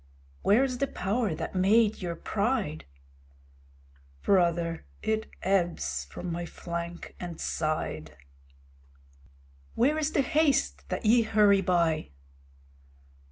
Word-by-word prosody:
Where 220 +6 +4
is 255 -2 -2
the 275 - +1
power 205 -3 -1
that - - -5
made 205 +4 +3
your 175 -2 -3
pride? 205 - -1 1.4
Brother, 170 - +1 0.2
it 220 0 -1
ebbs 180 -3 0
from 180 - -6
my 170 +1 -3
flank 170 0 -6
and 175 -2 -6
side. 80 - -3 1.6
Where 290 +6 +3
is 310 0 -1
the 280 - +3
haste 265 - +1
that - - -3
ye 230 +3 +6
hurry 210 -3 +4
by? 170 -4 +1
190 Hz, 110 wpm, -28 LUFS, 170-225 Hz, 1.6 s, ye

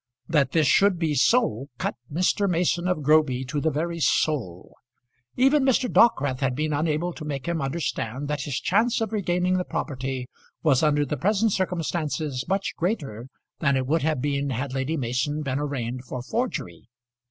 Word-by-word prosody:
That 150 -5 +2
this 160 -2 +3
should 195 +7 +4
be 160 -3 0
so 140 - +2
cut - - -2 0.2
Mr. 185 +5 +1
Mason 175 0 +1
of 180 -5 -1
Groby 140 -3 +3
to 145 +3 -3
the 160 - +2
very 165 +3 -2
soul. 130 - 0 0.6
Even 270 +3 +4
Mr. 260 -1 +2
Dockwrath 145 - +3
had 130 -2 0
been 155 +2 -1
unable 155 +3 0
to 160 - -9
make 140 -3 -4
him 170 -2 -1
understand 135 -3 -3
that 150 -1 -2
his 135 -1 -2
chance 230 +4 +2
of 225 -1 -2
regaining 180 -2 +1
the - - 0
property 130 -5 -4 0.4
was 145 -6 +4
under 145 -2 +2
the 145 +2 -3
present 210 - +2
circumstances 160 -7 -2
much 195 +1 0
greater 145 - -3 0.3
than 140 -3 +2
it 130 - -1
would 155 +5 +1
have 150 -4 0
been 140 -1 0
had 130 +1 -3
Lady 135 +4 -1
Mason 130 +4 -1
been 135 -1 -2
arraigned 130 -4 -3
for 125 -1 -6
forgery. 125 - -3
150 Hz, 175 wpm, -25 LUFS, 135-175 Hz, 0.6 s, should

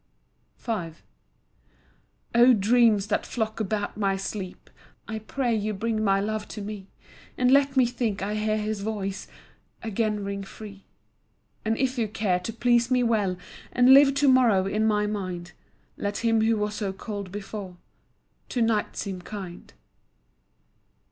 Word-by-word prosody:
V 210 -9 -3 1.4
O 240 +2 +7
dreams 215 -1 +4
that 205 - 0
flock 220 -2 -3
about 210 -1 -2
my 195 -2 +1
sleep, 195 -1 -6 0.4
I 220 +1 -4
pray 240 +2 -1
you 215 0 -2
bring 220 +1 -1
my 195 -2 +3
love 215 +1 -2
to 210 - -7
me, 200 -2 -7 0.5
And 250 0 +3
let 275 0 +4
me 255 - +6
think 230 -5 -2
I 205 +1 -2
hear 215 0 0
his 215 -1 -2
voice 200 -2 -4 0.6
Again 215 -1 -1
ring 200 0 -4
free. 200 0 -11 0.8
And 225 0 0
if 260 -1 0
you 225 - +1
care 205 -4 0
to 180 +5 -5
please 240 +1 +2
me 250 -1 +3
well, 210 -6 +1 0.3
And 250 +1 +6
live 275 0 +7
to 285 0 +3
morrow 240 -8 +5
in 215 +3 +1
my 210 -1 +2
mind, 185 -4 -4 0.5
Let 205 +3 -3
him 225 -1 +3
who 225 0 +2
was 210 0 -1
so 205 -2 -2
cold 200 -1 -6
before, 200 -2 -7 0.7
To 245 - -1
night 225 -2 0
seem 190 -2 -4
kind. 185 -3 -8
215 Hz, 150 wpm, -26 LUFS, 200-230 Hz, 1.4 s, O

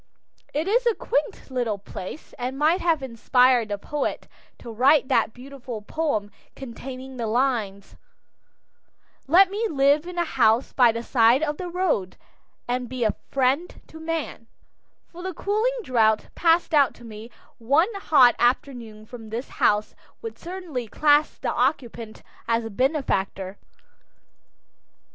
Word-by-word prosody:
It 310 +4 -2
is 480 +4 +2
a 460 - +3
quaint 285 -1 -3
little 240 -5 -1
place, 195 +6 -9
and 255 +2 -3
might 315 +6 +2
have 325 -5 +1
inspired 250 0 +3
the 205 - -2
poet 290 +7 -4 0.3
to 235 - -10
write 260 +5 +3
that - - +2
beautiful 250 -3 -9
poem 215 -7 -2 0.2
containing 260 +1 -9
the 230 -2 -3
lines, 220 -5 -1 1.3
Let 370 +6 +6
me 435 +3 -1
live 285 +2 +2
in 360 0 -8
a 345 - +1
house 225 -5 +2
by 245 -3 +5
the 230 +1 -5
side 240 +3 +3
of 300 -1 -1
the 360 -1 -5
road, 340 - -1 0.5
And 245 0 -2
be 255 -1 -3
a 215 - +2 0.2
friend 275 +6 0
to 320 - -13
man, 320 -7 -4 0.6
for 350 - -12
the 370 -1 -5
cooling 440 +5 0
draught 220 - +1
passed 335 0 +2
out 285 -4 +4
to 240 - -16
me 220 0 -10 0.3
one 295 - +2
hot 290 -11 +5
afternoon 240 -3 -1
from 225 -1 -11
this 235 +4 -5
house 210 0 +1 0.3
would 455 - -7
certainly 340 -9 -6
class 295 +6 +2
the - - -2
occupant 240 -4 -2 0.2
as 230 0 0
a 225 - -6
benefactor. 200 -7 -1
260 Hz, 145 wpm, -24 LUFS, 230-315 Hz, 1.3 s, Let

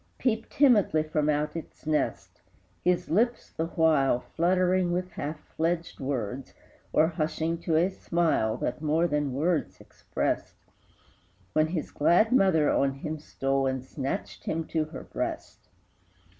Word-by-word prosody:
Peep 225 -3 -1
timidly 230 - +4
from 155 -1 0
out 150 +1 0
its 165 - -8
nest, 95 - -2 0.4
His 180 0 +1
lips, 235 +7 +1
the 160 - -2
while, 155 -7 +3
Fluttering 180 +3 +1
with 180 +1 -2
half 150 +2 -5 0.2
fledged 165 +1 -1
words, 130 -2 -4 0.4
Or 155 - +4
hushing 160 0 -2
to 165 -1 -1
a 165 +3 +4
smile 170 - 0
That 125 - -3
more 160 +2 +2
than 145 -5 0
words 160 +3 0
expressed, - - -3 1.0
When 155 0 +3
his 160 -2 -3
glad 180 +9 +3
mother 185 - +4
on 135 0 +2
him 155 +3 -5
stole 135 -2 -1
And 130 -1 -2
snatched 135 0 -5
him 165 0 -2
to 160 -2 0
her 155 - -9
breast! - - -5
160 Hz, 140 wpm, -28 LUFS, 145-175 Hz, 1.0 s, timidly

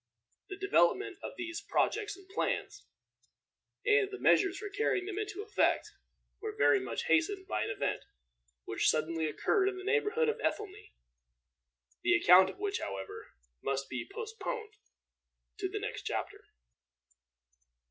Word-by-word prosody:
The 385 - -6
development 395 - +2
of - - -6
these 345 -1 -4
projects 420 -2 0
and 390 -1 -17
plans, 390 +3 -2 1.0
and 420 -1 +4
the 395 - -6
measures 385 -1 +4
for 415 - -5
carrying 400 -2 0
them 405 0 -4
into 410 -1 -4
effect, 425 - +1 0.5
were 430 0 -4
very 415 - +5
much 390 - -3
hastened 385 -3 +2
by 375 - -1
an - - -4
event - - -1 0.6
which - - +1
suddenly 160 +1 0
occurred 385 - +2
in 385 - -6
the 375 - -7
neighborhood 445 +2 +2
of 450 - 0
Ethelney, 420 -1 -3 1.1
the - - +4
account 185 +1 +7
of - - -9
which, 400 0 -2
however, 95 -1 -6 0.3
must 135 0 -2
be 125 -3 -5
postponed 445 0 -5 0.9
to - - -1
the - - -4
next - - -4
chapter. - - -4
395 Hz, 140 wpm, -32 LUFS, 355-420 Hz, 1.1 s, account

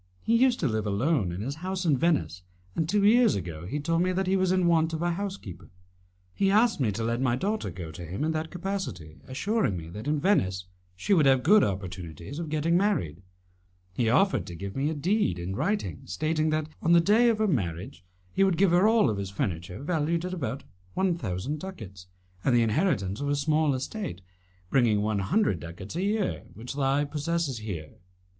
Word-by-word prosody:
He 230 - +2
used 250 +1 +4
to 150 - +2
live 110 -2 -1
alone 105 - +1
in 90 +3 -5
his 135 +7 -4
house 185 0 -3
in 155 -4 +4
Venice, 150 - 0 0.3
and 160 -1 -1
two 205 +1 +2
years 235 +3 +5
ago 85 -3 -5
he 145 +9 -3
told 165 +3 0
me 185 +1 +2
that 190 +1 0
he 190 +1 +2
was 185 -1 +2
in 185 -1 +2
want 165 -1 +3
of 160 +1 -2
a 175 - +1
housekeeper. 190 - -6 0.6
He 195 - +1
asked 220 +1 +3
me 120 -6 +1
to 115 - -3
let 115 +2 -1
my 125 -2 +2
daughter 205 - -2
go 85 -2 -7
to 85 +3 -9
him 90 - -4
in 160 - +1
that 160 0 -3
capacity, 175 - -5
assuring 175 - 0
me 80 -1 -8
that 105 +9 -7
in 150 0 +1
Venice 95 - +1 0.3
she 200 - 0
would 155 -7 +5
have 130 -2 +4
good 205 +6 +6
opportunities 95 - -5
of 165 -2 -4
getting 155 +2 +1
married. 175 - 0 0.7
He 115 +4 +1
offered 195 - +2
to 85 - -7
give 100 +3 -6
me 140 +3 0
a 160 - -3
deed 175 - +1
in 90 +2 -4
writing 200 - -1
stating 155 0 0
that, 155 0 0
on 170 - +3
the 170 - +7
day 215 +7 +4
of 225 - +2
her 215 0 +1
marriage, 95 - -2 0.3
he 195 - +3
would 190 -4 +2
give 190 0 +4
her 180 +4 +5
all 220 - +4
his 100 -1 -4
furniture 90 +2 -4
valued 165 +1 0
at 180 - -4
about 140 -6 -4 0.3
one 190 -2 +2
thousand 135 - -3
ducats, 100 - -9 0.4
and 130 - +3
the 120 - +4
inheritance 105 - 0
of 145 - -1
a 145 - +2
small 150 0 +2
estate, 130 - -5 0.5
bringing 115 -6 +3
one 105 -1 0
hundred 105 - +1
ducats 85 - -8
a 175 - -1
year, 205 0 -1
which 120 +3 -7
he 140 +1 +1
possesses 150 -2 -2
here. 90 -8 -7
145 Hz, 205 wpm, -27 LUFS, -, 0.7 s, the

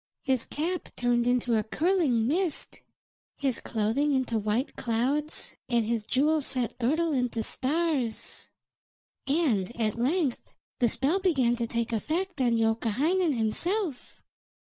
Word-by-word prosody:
His 260 -4 +1
cap 345 +5 -3
turned 240 0 +1
into 245 -1 +2
a 215 - +2
curling 300 - +1
mist, 330 +4 -1 0.6
his 270 -4 0
clothing 235 +7 0
into 245 -4 0
white 215 +6 -1
clouds, 260 +6 -1 0.2
and 235 -2 +2
his 230 -1 -1
jewel 300 +6 +2
set 255 -4 -2
girdle 310 +7 +1
into 250 -4 0
stars. 275 -3 -1 0.8
And 240 - +1
at 220 0 0
length 275 +1 0 0.2
the 240 - +4
spell 290 - +1
began 270 -11 +2
to 235 -1 -1
take 235 0 -2
effect 325 - -2
on 240 -2 +3
Youkahainen 255 - +1
himself. 320 - -2
255 Hz, 125 wpm, -28 LUFS, 230-310 Hz, 0.8 s, the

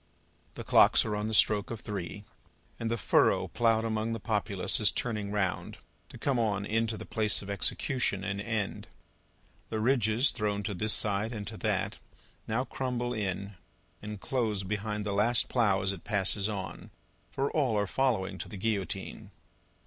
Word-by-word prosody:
The - - -6
clocks - - +5
are 105 -2 -1
on 105 +1 -2
the 110 - -3
stroke 105 -1 +4
of 115 -2 -6
three, 100 -1 -5 0.6
and 115 - -2
the 115 - 0
furrow - - +3
ploughed 115 -1 +2
among 110 0 -1
the 115 - -3
populace 105 -2 0
is 105 - +5
turning 105 -4 -2
round, 100 -3 -2 0.3
to - - -11
come 135 -4 0
on 100 -3 0
into 115 +1 0
the - - -8
place 110 -2 +2
of 100 - -6
execution, 100 0 0
and 100 0 -2
end. 105 -2 -3 0.8
The 110 - -2
ridges 120 +1 +3
thrown 105 -1 -2
to 105 - -3
this 105 +3 +3
side 105 +1 0
and 105 -3 -5
to - - -6
that, - - -1 0.5
now 115 +4 0
crumble 125 -2 -2
in 100 -2 -3 0.4
and 105 -1 -6
close 110 -5 -1
behind 105 +1 -3
the 100 - -1
last 110 +4 +4
plough 105 -6 +2
as 95 - +1
it 95 -4 -8
passes 100 -1 +1
on, 95 -3 -6 0.4
for 135 +1 -1
all 130 -8 +1
are 100 - +1
following 115 -4 0
to - - -6
the 105 - -7
Guillotine. 100 -2 -3
105 Hz, 170 wpm, -30 LUFS, 100-115 Hz, 0.8 s, clocks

